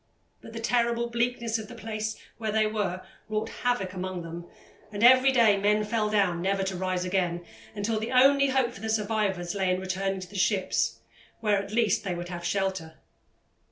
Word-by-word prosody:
But 225 - -12
the 230 - -5
terrible 235 0 0
bleakness 235 -1 -1
of 215 - -7
the 240 - -10
place 220 -1 -4 0.2
where 220 -1 -2
they 215 0 +2
were 205 -4 -2 0.3
wrought 215 +1 -2
havoc 245 -7 0
among 185 -1 -4
them, 170 +1 -8 0.4
and 205 +1 -3
every 260 +2 +7
day 230 -6 +5
men 210 +2 +2
fell 215 0 0
down 195 -5 +1
never 195 +1 0
to 190 0 -2
rise 185 0 -1
again, 175 -2 -1 0.3
until 215 +2 -1
the 220 +3 -4
only 275 +2 +5
hope 260 -2 +1
for 200 - -12
the 220 - -3
survivors 205 -5 0
lay 190 -2 0
in 185 - 0
returning 190 +1 -2
to 185 - -8
the 200 - -14
ships, 115 - +1 0.4
where, 210 -3 +2
at 200 - -9
least, 220 -3 +2
they 185 -3 -2
would 175 0 -6
have 175 -1 -6
shelter. 190 -4 -2
205 Hz, 195 wpm, -27 LUFS, 185-225 Hz, 0.4 s, every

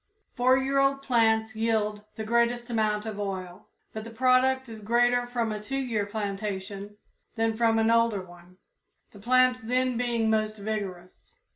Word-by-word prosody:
Four 255 +1 +3
year 270 +1 +1
old 275 0 +2
plants 220 -3 +2
yield 215 -2 0
the 220 - -5
greatest 235 +2 +1
amount 215 -2 0
of 215 -2 -5
oil, 190 -1 -5 0.3
but 220 - -5
the 230 - -9
product 260 +2 +2
is 220 -2 -9
greater 245 +3 +2
from 235 -2 -2
a 210 -1 -4
two 270 +6 -4
year 230 -6 -1
plantation 200 -1 -5 0.4
than 225 -1 0
from 225 0 +2
an 225 0 +3
older 230 -4 +2
one, 175 0 -16 0.5
the 205 - -14
plants 255 +3 +3
then 250 +1 0
being 235 -2 0
most 215 0 0
vigorous. 200 -4 -6
225 Hz, 160 wpm, -27 LUFS, 210-245 Hz, 0.5 s, Four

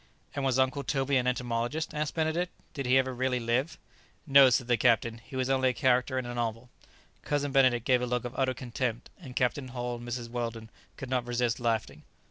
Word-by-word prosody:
"And 140 - -3
was 130 -2 +1
Uncle 130 +2 +1
Toby 135 +1 0
an 125 0 0
entomologist?" 125 +4 -2
asked 150 -1 -2
Benedict; 165 +2 0 0.2
"did 140 -3 -4
he 130 +1 +5
ever 130 0 +1
really 125 0 0
live?" 120 +6 -1 0.5
"No," 140 -3 +7
said 125 0 +1
the 120 0 +3
captain, 115 +1 +2
"he 115 +3 -12
was 130 -1 0
only 130 -1 +2
a - - -1
character 130 0 +2
in 130 - -2
a 120 - -5
novel." 120 0 -3 0.5
Cousin 145 -1 -1
Benedict 130 -4 +3
gave 125 -2 +3
a 125 - -1
look 125 0 -1
of 120 - -5
utter 130 -1 0
contempt, 120 -1 -4
and 135 -8 -10
Captain 130 +2 0
Hull 120 -1 -4
and 120 0 -10
Mrs 120 -1 -4
Weldon 115 -2 -4 0.3
could 130 -2 -7
not 125 -2 0
resist 120 -1 0
laughing. 115 -2 -1
125 Hz, 210 wpm, -29 LUFS, 120-135 Hz, 0.5 s, No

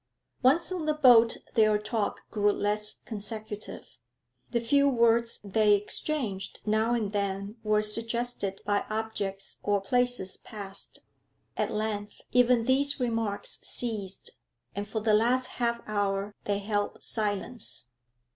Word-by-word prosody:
Once 285 +8 +4
on 345 -4 -3
the 305 - +2
boat 240 -6 +6 0.2
their 215 -1 +4
talk 210 0 -2
grew 205 -2 +3
less 210 +1 0
consecutive; 215 -1 -6 0.6
the 235 - +1
few 280 +5 +3
words 235 -2 +3
they 210 +1 +4
exchanged 210 -1 -2
now 220 +2 +2
and 215 -4 -1
then 200 0 -2
were 215 0 +2
suggested 230 -2 -2
by 205 0 +1
objects 205 -3 -3
or 205 -1 +2
places 245 -2 +1
passed. 200 -3 -8 0.5
At - - 0
length 210 -1 -3
even 245 -1 +4
these 280 +4 +2
remarks 225 -4 -1
ceased, 205 -5 -2 0.4
and 205 +1 -4
for 220 - -2
the 215 0 +2
last 245 +4 +3 0.2
half 235 0 +1
hour 205 -1 -1
they 205 -1 +1
held 205 0 -2
silence. 210 - -3
215 Hz, 125 wpm, -28 LUFS, 205-235 Hz, 0.6 s, boat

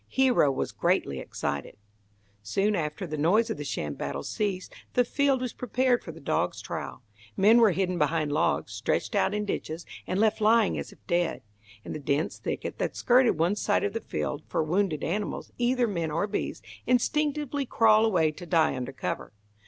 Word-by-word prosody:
Hero 255 - +3
was 135 - -2
greatly 70 -1 0
excited. - - -4 0.6
Soon 195 - 0
after 155 +3 -3
the 155 -3 -5
noise 215 +9 +3
of - - -3
the 145 - -5
sham 75 - -3
battle 70 0 -4
ceased, 195 -3 -3 0.2
the 245 - +4
field 275 -1 +1
was 250 -2 -3
prepared 250 +1 +1
for 165 - -7
the 165 - -12
dog's 140 - -1
trial. - - -6 0.3
Men 215 +5 +6
were 225 -2 +6
hidden 180 -1 0
behind 150 0 +1
logs, 155 -7 0
stretched 105 +2 -1
out 205 0 +2
in 210 0 -1
ditches, 165 -4 -4 0.2
and 185 - -1
left 220 0 +2
lying 220 -1 +4
as - - -6
if - - -20
dead, 175 -2 0 0.4
in - - -5
the - - -4
dense 145 +2 -1
thicket - - -4
that - - -1
skirted 250 0 +4
one 170 +5 +2
side 205 0 +1
of 200 - -1
the 225 - -3
field, 145 - -3
for - - 0
wounded 165 -1 0
animals, 200 +5 -3
either 245 0 +2
men 170 -7 -2
or 165 +6 0
beasts, 205 - -4 0.2
instinctively 290 +2 +1
crawl 220 -2 +5
away 175 -8 +3
to 175 +3 -10
die 165 -2 +3
under 130 +1 -4
cover. 90 -3 -4
195 Hz, 185 wpm, -27 LUFS, 155-230 Hz, 0.6 s, Men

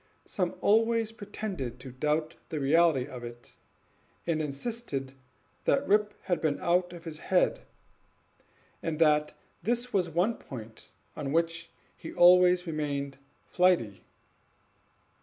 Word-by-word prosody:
Some 180 -3 -2
always 225 +1 +3
pretended 195 - -6
to 130 - -8
doubt 150 +5 -1 0.2
the 155 - -3
reality 150 -1 +3
of 125 -3 -9
it, 120 0 -10 0.7
and 160 -2 0
insisted 145 - -4 0.5
that - - +2
Rip 210 +1 +2
had 175 -4 -1
been 150 -3 0
out 175 +1 +1
of 170 -2 -10
his 160 -2 -7
head, 185 +1 +1 1.2
and 165 -2 -2
that 150 -1 +3 0.3
this 240 +2 -1
was 180 -3 +2
one 180 +8 +1
point 110 -4 -10 0.3
on 140 -2 -4
which 165 +1 0 0.3
he 160 - -9
always 180 0 +6
remained 140 -4 -3 0.3
flighty. 165 - +2
165 Hz, 120 wpm, -29 LUFS, 140-180 Hz, 1.2 s, always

